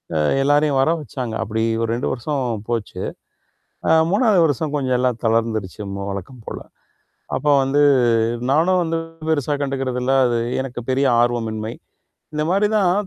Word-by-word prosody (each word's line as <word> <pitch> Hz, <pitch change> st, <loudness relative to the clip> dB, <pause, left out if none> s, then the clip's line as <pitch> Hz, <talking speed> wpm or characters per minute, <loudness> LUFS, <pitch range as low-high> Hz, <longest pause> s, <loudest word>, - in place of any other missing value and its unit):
அ, -, -, +2 dB, 0.3 s
எல்லாரையும் 145 Hz, 0 st, +3 dB
வர 135 Hz, -, +2 dB
வச்சாங்க. 125 Hz, -5 st, -5 dB
அப்பிடி 110 Hz, +1 st, -2 dB, 0.2 s
ஒரு 115 Hz, -, -1 dB
2 120 Hz, -, -2 dB
வருஷம் 125 Hz, -4 st, -3 dB
போச்சு. 115 Hz, -4 st, -3 dB, 0.9 s
ஆ, -, -, +3 dB, 0.2 s
3 210 Hz, -3 st, +4 dB
வருஷம் 150 Hz, 0 st, -1 dB
கொஞ்சம் 130 Hz, -3 st, 0 dB
எல்லாம் 125 Hz, -2 st, 0 dB
தளர்ந்திருச்சு 110 Hz, -3 st, 0 dB
மு 100 Hz, -, -4 dB
வழக்கம் 100 Hz, +5 st, -8 dB
போல. -, -, -5 dB, 0.8 s
அப்ப 150 Hz, -, -5 dB, 0.2 s
வந்து 140 Hz, +2 st, +2 dB, 0.7 s
நானும் 180 Hz, +5 st, +3 dB
வந்து 165 Hz, 0 st, -1 dB, 0.3 s
பெருசா 145 Hz, -2 st, +1 dB
கண்டுக்கிறதில்ல. 135 Hz, -2 st, -1 dB
அது 120 Hz, -1 st, +1 dB, 0.2 s
எனக்குப் 125 Hz, -3 st, -6 dB
பெரிய 135 Hz, +2 st, +2 dB, 0.2 s
ஆர்வமின்மை. 115 Hz, -2 st, -1 dB, 0.6 s
இந்தமாரி 175 Hz, +7 st, +1 dB
தான் 195 Hz, +1 st, +2 dB
130 Hz, 140 wpm, -21 LUFS, 115-150 Hz, 0.9 s, 3